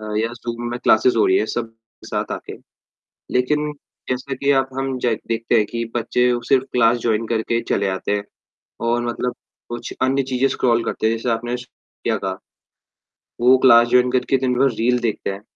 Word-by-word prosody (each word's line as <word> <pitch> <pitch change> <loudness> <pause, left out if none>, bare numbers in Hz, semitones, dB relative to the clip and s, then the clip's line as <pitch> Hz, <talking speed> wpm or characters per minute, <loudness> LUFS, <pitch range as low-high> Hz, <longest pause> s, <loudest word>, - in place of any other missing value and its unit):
अ, 110 - -8
या 110 +1 +1
ज़ूम 120 0 -5
में 120 - -3
क्लास - - +4
हो - - +4
रही 375 - +4
है 395 - +2
सब 115 -1 -3 0.3
साथ - - -3
आके। - - -6 0.8
लेकिन 150 +4 +1 0.4
जैसा 130 +2 -2
कि 140 +2 +1
अब 135 - -6
ज - - -9
हम 135 0 -1 0.4
देखते 115 +1 0
हैं 105 -2 +4
कि 115 +1 -4
बच्चे 125 +1 +1 0.2
सिर्फ़ 135 -1 +3
क्लास 120 -1 +4
जॉइन 110 0 +1
करके 115 +1 0
चले 100 - +1
आते 95 +2 -3
हैं 100 - -3 0.7
और 120 +1 +1
मतलब 120 +1 -2 0.3
कुछ 120 0 -6
अन्य 135 +1 +2
चीज़ें 130 +2 +2
स्क्रॉल 120 -2 +1
करते 110 - -2
हैं। 115 - +1
जैसे 115 +2 -2
आपने 120 +2 -1
श 125 - -9 0.4
क्या - - +1
कहा? - - -4 1.0
वो 125 +2 +6
क्लास 120 -2 +6
जॉइन 125 +1 +4
करके 130 +1 +2
दिन 130 -1 0
भर 135 0 +4
रील 125 +2 +2
देखते 110 -4 -2
हैं। 95 - -8
120 Hz, 195 wpm, -21 LUFS, 115-130 Hz, 1.0 s, वो